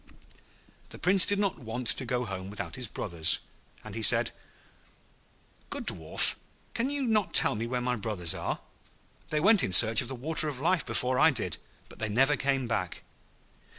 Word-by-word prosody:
The - - -11
Prince 185 +2 +4
did 205 - +4
not 200 -5 -2
want 120 0 -7
to 130 - +3
go 125 +1 -3
home 95 -2 -7
without 100 -5 -6
his 125 -2 -4
brothers, 85 -6 +2 0.5
and 110 - -11
he 115 - -6
said, 110 - +3 1.4
'Good - - -5
Dwarf, 80 -2 0 0.4
can 255 +3 -2
you 285 -1 -2
not 220 -5 -1
tell - - +7
me 110 +2 -5
where 125 +1 -3
my 125 0 -2
brothers 100 -7 -1
are? - - -5 0.7
They 150 -2 -1
went 200 +4 +4
in - - -2
search 110 +4 +7
of 125 - -7
the 135 - -5
Water 155 +4 0
of 135 -4 -8
Life 175 +4 -1
before 125 0 -1
I 160 - +5
did, 110 - -3 0.3
but - - -16
they 110 - -3
never 135 +7 +1
came 135 -1 -2
back.' 100 -6 -4
125 Hz, 185 wpm, -27 LUFS, 110-155 Hz, 1.4 s, tell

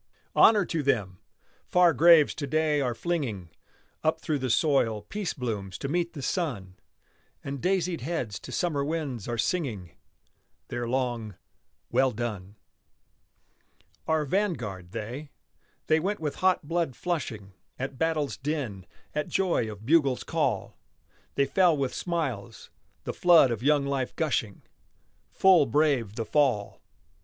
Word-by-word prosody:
Honor 210 -4 +6
to 165 -2 -2
them! 100 -10 0 0.5
Far 180 -2 +5
graves 165 +1 +6
to 145 - -5
day 155 0 +1
are 125 -3 -1
flinging 115 - -3 0.5
Up 160 +1 +1
through 155 -2 -1
the 130 -1 -2
soil 115 -6 +2
peace 205 -3 -4
blooms 105 - -4
to - - -4
meet 170 +3 -1
the 140 -5 -7
sun, 120 - -2 0.7
And 140 -1 -5
daisied 180 -4 0
heads 125 - -3
to - - -10
summer 155 -6 0
winds 145 -8 -3
are 120 -1 -2
singing 115 - -2 0.8
Their 120 -1 -3
long 120 -5 -2 0.6
"well 130 +2 +3
done." 105 -5 -5 1.5
Our 160 -1 +1
vanguard, 120 - -2
they. 125 +10 -6 0.6
They 155 0 +3
went 200 +5 -2
with 150 -3 -3
hot 185 -5 +2
blood 165 -5 -1
flushing 115 - -4 0.2
At 135 0 -5
battle's 155 -6 0
din, 130 - -4 0.3
at 150 -1 -2
joy 175 - 0
of 105 +1 -11
bugle's 140 -3 +3
call. - - -2 0.6
They 140 - +3
fell 175 -1 +3
with 135 -2 -1
smiles, 130 - -4 0.3
the - - -4
flood 170 -7 +6
of 115 -2 -3
young 145 +1 +3
life 135 -2 -2
gushing, 120 - -1 0.7
Full 185 -6 +5
brave 130 -6 +1
the 115 - -3
fall! 130 -9 +1
140 Hz, 135 wpm, -27 LUFS, 115-165 Hz, 1.5 s, Honor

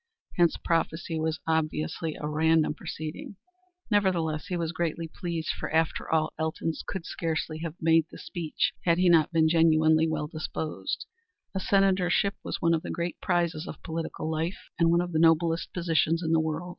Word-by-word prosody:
Hence 175 -2 +3
prophecy 165 -1 -1
was 160 0 -1
obviously 160 0 -1
a 150 - -5
random 160 +1 +2
proceeding. 155 +5 -7 0.6
Nevertheless 170 -7 +1
he 180 -2 -2
was 165 -1 -1
greatly 165 -1 -2
pleased, 165 -2 -4
for, - - -3
after 160 +1 0
all, 155 -1 +1
Elton 160 +1 -1 0.2
would 190 -4 -5
scarcely 160 -1 -3
have 165 -1 -5
made 165 0 +4
the - - -11
speech 165 -4 -2
had 170 -1 +3
he 180 0 +4
not 165 -2 +5
been 160 -1 +4
genuinely 160 -1 +4
well 150 -1 -1
disposed. 155 0 -4 0.5
A 190 - -1
senatorship 195 0 +2
was - - -4
one 170 -2 +3
of 160 - +1
the - - -7
great 170 0 -3
prizes 170 -3 0
of - - -9
political 165 -1 -4
life, 160 +3 -3
and 165 -1 +4
one 170 +1 +4
of 175 0 -4
the 160 - +1
noblest 165 0 +3
positions 165 -1 +1
in 160 - -1
the 165 - +4
world. 160 +2 -2
165 Hz, 175 wpm, -28 LUFS, 160-170 Hz, 0.6 s, not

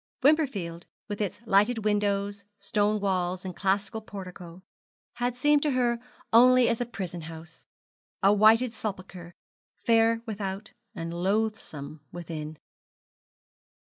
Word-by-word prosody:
Wimperfield 225 - +1 0.2
with 205 0 -4
its 205 0 -3
lighted 220 +2 +3
windows, 205 -1 0
stone 205 +1 0
walls, 185 -2 -1
and 180 -2 -5
classic 195 +1 0
portico, 180 -2 -9 0.5
had 245 0 -1
seemed 295 +3 +4
to 295 -2 +1
her 240 -2 +1 0.3
only 250 +1 +7
as 230 +1 0
a 245 - -1
prison 180 -7 -5
house, 160 0 -11 0.6
a 200 +1 +6
whited 220 +3 +5
sepulchre, 185 -5 -7 0.4
fair 230 -1 +3
without 205 -1 -5 0.2
and 165 0 -5
loathsome 175 -6 -2
within. 160 -3 -6
200 Hz, 115 wpm, -27 LUFS, 180-225 Hz, 0.6 s, only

